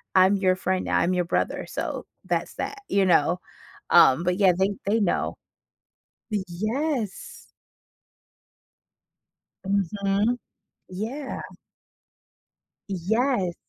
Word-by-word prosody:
"I'm 190 Hz, +2 st, +6 dB
your 185 Hz, -1 st, +3 dB
friend, 185 Hz, 0 st, -1 dB
I'm 180 Hz, +2 st, +2 dB
your 180 Hz, -1 st, +1 dB
brother." -, -, -1 dB
So, -, -, -4 dB, 0.2 s
that's -, -, -1 dB
that, 415 Hz, -1 st, -5 dB
you 200 Hz, -1 st, +3 dB
know? 175 Hz, 0 st, +3 dB, 0.5 s
Um, 135 Hz, +6 st, +6 dB
but, 180 Hz, +1 st, +1 dB
yeah, 190 Hz, -3 st, +5 dB
they 190 Hz, +2 st, +2 dB
they 215 Hz, +3 st, +2 dB
know. 195 Hz, -, 0 dB, 0.9 s
Yes. 215 Hz, -, -2 dB, 2.3 s
Mhm, 200 Hz, +4 st, +1 dB, 0.5 s
yeah. 235 Hz, +9 st, -5 dB, 1.5 s
Yes. 195 Hz, 0 st, 0 dB
195 Hz, 90 wpm, -25 LUFS, 180-215 Hz, 2.3 s, I'm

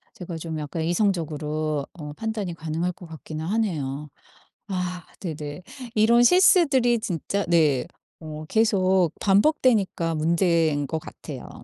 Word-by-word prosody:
제가 175 Hz, -2 st, -6 dB
좀 160 Hz, -1 st, -5 dB
약간 150 Hz, +2 st, -4 dB
이성적으로 155 Hz, -5 st, -1 dB
어 150 Hz, -4 st, -8 dB
판단이 215 Hz, -1 st, -3 dB
가능할 165 Hz, +2 st, -2 dB
것 175 Hz, -, -13 dB
같기는 160 Hz, -1 st, -7 dB
하네요. 155 Hz, -9 st, -2 dB, 0.6 s
아 180 Hz, -3 st, -3 dB, 0.2 s
네네. 150 Hz, -1 st, -5 dB, 0.3 s
이런 225 Hz, +2 st, +5 dB
실수들이 275 Hz, -8 st, +5 dB
진짜 200 Hz, +1 st, -2 dB
네 155 Hz, -7 st, +3 dB, 0.4 s
어 155 Hz, 0 st, -7 dB
계속 190 Hz, -5 st, +3 dB
반복되니까 200 Hz, -, +2 dB
문제인 160 Hz, -2 st, +2 dB
것 160 Hz, +4 st, -3 dB
같아요. -, -, -9 dB
170 Hz, 265 characters per minute, -24 LUFS, 155-200 Hz, 0.6 s, 이런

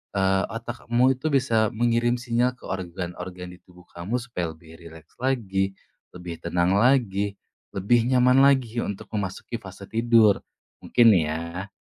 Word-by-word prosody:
eee, 95 Hz, 0 st, +2 dB
otak 115 Hz, +2 st, -7 dB
kamu 125 Hz, +3 st, +3 dB
itu 155 Hz, -, -2 dB
bisa 115 Hz, -5 st, +2 dB
mengirim 120 Hz, +1 st, +2 dB
sinyal 120 Hz, +1 st, 0 dB
ke -, -, -25 dB
organ-organ 90 Hz, 0 st, -6 dB
di 90 Hz, -, -14 dB
tubuh 90 Hz, -1 st, -19 dB
kamu 100 Hz, +9 st, -3 dB
supaya 90 Hz, -9 st, -4 dB
lebih 80 Hz, 0 st, -16 dB
rileks 80 Hz, -2 st, -14 dB
lagi, 100 Hz, -7 st, -1 dB, 0.4 s
lebih 90 Hz, -2 st, -8 dB
tenang 90 Hz, +2 st, +1 dB
lagi, 105 Hz, -5 st, +2 dB, 0.4 s
lebih 115 Hz, +5 st, +2 dB
nyaman 125 Hz, 0 st, +4 dB
lagi 125 Hz, -4 st, +2 dB
untuk 100 Hz, -, -6 dB
memasuki 100 Hz, +3 st, -4 dB
fase 95 Hz, +1 st, -11 dB
tidur. 115 Hz, -2 st, +4 dB, 0.4 s
Mungkin 115 Hz, -2 st, +5 dB
ya, 85 Hz, +4 st, -3 dB
100 Hz, 140 wpm, -24 LUFS, 90-120 Hz, 0.4 s, Mungkin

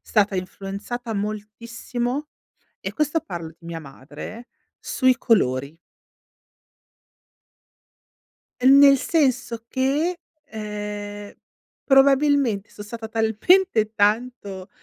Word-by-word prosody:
stata 205 Hz, -2 st, +1 dB
influenzata 200 Hz, +6 st, -5 dB
moltissimo, 230 Hz, +6 st, -4 dB, 0.5 s
e -, -, -4 dB
questo 305 Hz, +1 st, 0 dB
parlo 170 Hz, -3 st, -6 dB
di 170 Hz, -, -18 dB
mia 170 Hz, -1 st, -5 dB
madre, 150 Hz, -, -10 dB, 0.3 s
sui 255 Hz, -1 st, +2 dB
colori. 140 Hz, -, +1 dB, 2.9 s
Uhm, 270 Hz, +2 st, +7 dB
nel 275 Hz, -1 st, +8 dB
senso 250 Hz, -7 st, 0 dB
che, 290 Hz, +8 st, 0 dB, 0.3 s
ehm, 205 Hz, -1 st, -6 dB, 0.5 s
probabilmente 270 Hz, -5 st, +3 dB
son 205 Hz, -, -10 dB
stata 225 Hz, +1 st, -7 dB
talmente 225 Hz, -, +2 dB
tanto, 205 Hz, -3 st, -1 dB
225 Hz, 85 wpm, -23 LUFS, 205-265 Hz, 2.9 s, nel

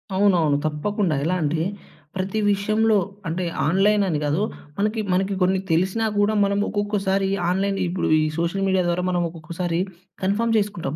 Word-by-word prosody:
అవునవును. 175 Hz, -7 st, +3 dB
తప్పకుండా 165 Hz, +3 st, 0 dB
ఎలా 180 Hz, +3 st, +1 dB
అంటే, 155 Hz, +2 st, 0 dB, 0.5 s
ప్రతి 190 Hz, +3 st, -2 dB
విషయంలో 215 Hz, +2 st, +2 dB, 0.3 s
అంటే 175 Hz, +2 st, -2 dB, 0.2 s
ఆన్‍లైనని 195 Hz, -2 st, +2 dB
గాదు. 150 Hz, +8 st, +1 dB, 0.3 s
మనకి 210 Hz, +2 st, 0 dB
మనకి 190 Hz, +2 st, +1 dB
కొన్ని 185 Hz, +1 st, +3 dB
తెలిసినా 190 Hz, +7 st, +1 dB
గూడా 205 Hz, +1 st, +2 dB
మనము 200 Hz, +1 st, +1 dB
ఒక్కొక్కసారి, 195 Hz, -2 st, 0 dB, 0.2 s
ఆన్‍లైన్ 195 Hz, +2 st, 0 dB
ఇప్పుడు 180 Hz, +1 st, -1 dB
ఈ -, -, +2 dB
సోషల్ 170 Hz, +4 st, -1 dB
మీడియా 190 Hz, -1 st, +2 dB
ద్వారా 175 Hz, +1 st, 0 dB
మనం 175 Hz, -1 st, +1 dB
ఒక్కొక్కసారి 165 Hz, +1 st, -3 dB, 0.4 s
కన్ఫర్మ్ 225 Hz, +4 st, +1 dB
చేసుకుంటాం. 200 Hz, -8 st, -2 dB
190 Hz, 140 wpm, -23 LUFS, 170-205 Hz, 0.5 s, అవునవును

